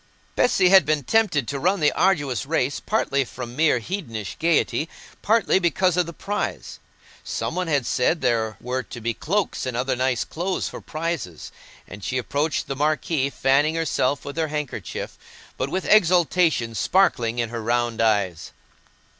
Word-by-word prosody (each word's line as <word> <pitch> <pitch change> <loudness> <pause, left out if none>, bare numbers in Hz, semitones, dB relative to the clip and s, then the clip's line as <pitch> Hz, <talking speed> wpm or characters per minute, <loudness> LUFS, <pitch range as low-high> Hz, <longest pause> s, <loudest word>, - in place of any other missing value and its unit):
Bessy 195 -7 +3
had 190 -2 +8
been 150 -1 0
tempted 175 - +2
to 140 0 -3
run 185 +6 +1
the 150 - +3
arduous 145 -10 +1
race, 140 -3 0
partly 140 -10 0
from 120 -1 -8
mere 155 -2 +3
hedonish 115 - -5
gaiety, 165 -1 +1 0.3
partly 220 -3 +3
because 180 0 +2
of 180 -2 +1
the - - -5
prize. 205 +5 -4 0.4
Some - - -3
one 180 -1 -2
had 145 -6 +1
said 125 +8 +1
there 110 -4 0
were 125 +2 -2
to 120 - -10
be 115 +1 -2
cloaks 190 - -2
and 125 -2 -3
other 130 +2 0
nice 130 -1 0
clothes 180 +3 -3
for - - -8
prizes, 155 - -4 0.4
and 105 - -10
she 130 - -2
approached 145 +4 -1
the 135 - -4
marquee, 150 -1 0
fanning 140 +4 +2
herself 145 -4 0
with 140 +2 -7
her 160 -1 +1
handkerchief, 150 -2 -5 0.4
but 130 - -2
with 185 +5 -2
exultation 175 - +3
sparkling 120 - +2
in 115 -2 -1
her 115 0 -5
round 120 0 0
eyes. 100 -7 0
145 Hz, 165 wpm, -23 LUFS, 120-170 Hz, 0.4 s, had